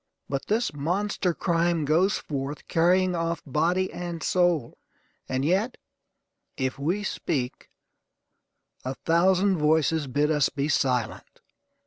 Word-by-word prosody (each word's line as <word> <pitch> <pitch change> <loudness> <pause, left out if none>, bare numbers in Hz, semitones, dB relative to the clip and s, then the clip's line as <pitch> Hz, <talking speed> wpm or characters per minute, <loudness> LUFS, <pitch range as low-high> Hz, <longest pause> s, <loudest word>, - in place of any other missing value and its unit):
But 135 -1 -3
this 220 -3 0
monster 180 +5 -1
crime 170 -2 0
goes 175 +7 +3
forth, 140 0 -5
carrying 180 +2 +3
off 165 0 -2
body 170 +6 0
and 175 -2 -5
soul; 175 -8 +1 0.5
and 130 +1 -1
yet, 195 - +1 0.8
if 130 0 -2
we 175 +9 -1
speak, 135 -10 -3 1.1
a 130 +1 -3
thousand 185 +4 +2
voices 155 0 +2
bid 145 +4 +1
us 150 -3 +3
be 145 +1 -2
silent. 125 -6 -1
165 Hz, 115 wpm, -26 LUFS, 145-180 Hz, 1.1 s, goes